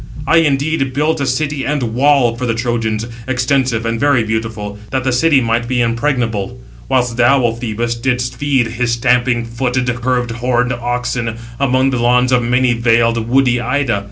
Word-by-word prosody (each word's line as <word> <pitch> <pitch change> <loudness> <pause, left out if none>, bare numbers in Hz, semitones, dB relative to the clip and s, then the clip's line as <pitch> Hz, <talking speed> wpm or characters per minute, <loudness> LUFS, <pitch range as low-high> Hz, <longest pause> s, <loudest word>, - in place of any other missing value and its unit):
I 165 - +3
indeed 145 -3 +1
built 150 +1 0
a 140 - -1
city 145 +1 -1
and 130 -6 -2
wall 130 -2 +3
for 125 +1 -4
the 115 - 0
Trojans, 115 -2 -2 0.2
extensive 130 -2 0
and 115 0 -1
very 140 -4 +3
beautiful, 110 -2 -4
that 130 -1 -2
the 130 - 0
city 140 +2 +3
might 120 0 0
be 125 0 -1
impregnable; 115 -4 -1 0.3
whilst 125 -2 0
thou, 120 +2 +4
O 115 - +1
Phoebus, 115 0 -3
didst 125 +1 -2
feed, 135 -1 +1
his 120 +1 -1
stamping 120 0 +1
footed, 125 +1 -1
curved 125 -1 0
horned 125 +1 0
oxen, 120 -1 -3 0.2
among 135 0 +2
the 125 - -1
lawns 125 +1 +3
of 125 -1 +3
many 125 +1 +2
valed, 115 -1 +1
woody 125 -1 +3
Ida. 125 -3 0
125 Hz, 170 wpm, -16 LUFS, 115-130 Hz, 0.3 s, thou